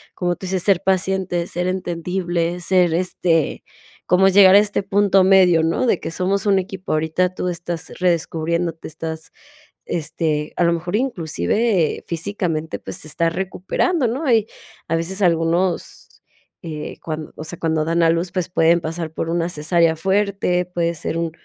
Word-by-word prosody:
como 175 -1 -1
tú 190 - -9
dices, 185 0 -1
ser 195 -4 +3
paciente, 185 -2 0
ser 180 0 -3
entendible, 175 -1 -2
ser 180 -2 +3
este 170 -2 0 0.4
como 185 +1 +4
llegar 190 -1 +7
a - - +9
este 205 -1 0
punto 195 -1 +3
medio, 185 -3 +5
¿no? 165 +10 +1
De 195 - +2
que - - -5
somos 190 +3 -1
un 195 -1 +4
equipo, 190 0 -5
ahorita 160 +4 0
tú 180 - -3
estás 175 -1 -5
redescubriéndote, 170 -1 -1
estás, 160 0 -7 0.5
este, 155 -2 -2
a - - +2
lo 170 - +3
mejor 175 +3 -3
inclusive 190 - 0
físicamente, 170 -2 -3
pues, - - -6
te - - -8
estás 165 +2 0
recuperando, 190 - -1
¿no? 260 +4 -1
Y 220 -2 +3 0.4
a 165 - 0
veces 180 +5 -3
algunos, 170 +1 0 0.4
eh, 155 -3 -6
cuan 155 -1 -5
o - - -7
sea, 160 +2 -6
cuando 160 -1 0
dan 165 +1 +1
a 165 - +5
luz, 170 +2 -1
pues, 185 -2 -2
pueden 170 -1 +3
pasar 165 0 -4
por 165 - -3
una 170 0 0
cesárea 165 +1 +2
fuerte, 195 0 0
puede 170 -1 -2
ser 160 - -4
un 165 -1 -2
175 Hz, 165 wpm, -20 LUFS, 165-190 Hz, 0.5 s, a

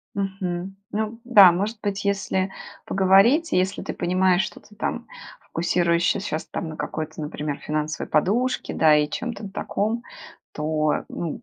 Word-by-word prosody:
Мгм. 190 -1 -3
Ну 220 +2 -3
да, 200 -7 +8
может 205 +6 -2
быть, 200 -1 -2
если 195 -1 0 0.4
поговорить, 195 - +4
и - - +4
если 185 +2 -1
ты - - -5
понимаешь, 185 +1 +2
что - - -6
ты 210 - -19
там - - -3 0.4
фокусируешься 170 +3 +1
щас 155 - -4
на 160 -2 -4
какой-то, 155 0 -5
например, 150 -1 -4
финансовой 155 0 -3
подушке, 225 +11 +1
да, 155 -1 +5
и 150 0 +2
чем-то 220 -2 -5
таком, 215 +4 -2 0.5
то, 155 0 0
ну, 175 +8 -5
190 Hz, 140 wpm, -24 LUFS, 160-205 Hz, 0.5 s, да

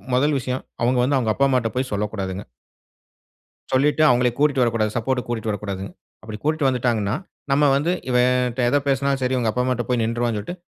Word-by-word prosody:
முதல் 145 +2 +2
விஷயம் 130 0 -4 0.2
அவங்க 125 +1 +2
வந்து 135 +2 +2
அவங்க 110 -3 0
அப்பா, 140 0 +3
அம்மாட்ட 125 -4 +1
போய் 130 -1 -2
சொல்லக்கூடாதுங்க. 100 -2 -3 1.3
சொல்லிட்டு 145 +4 +2
அவங்களை 125 0 +3
கூட்டிட்டு 140 -3 +3
வரக்கூடாது, 115 -3 0
சப்போர்ட்க்கு 125 +1 -1
கூட்டிட்டு 115 -2 -2
வரக்கூடாதுங்க. 100 -2 -5 0.3
அப்டி 110 -1 -7
கூட்டிட்டு 155 -2 +1
வந்துட்டாங்கனா, 120 -4 0 0.4
நம்ம 140 +2 +3
வந்து 150 +5 +1 0.2
இவன்கிட்ட 125 0 +2
எத 145 - +3
பேசினாலும் 135 0 +1
சரி 130 +1 0
இவங்க 120 -3 0
அப்பா 125 - -1
அம்மாட்ட 125 -1 -1
போய் 125 -2 +1
நின்றுவானு 115 0 -1
சொல்லிட்டு, 105 - -5
125 Hz, 175 wpm, -22 LUFS, 110-135 Hz, 1.3 s, அப்பா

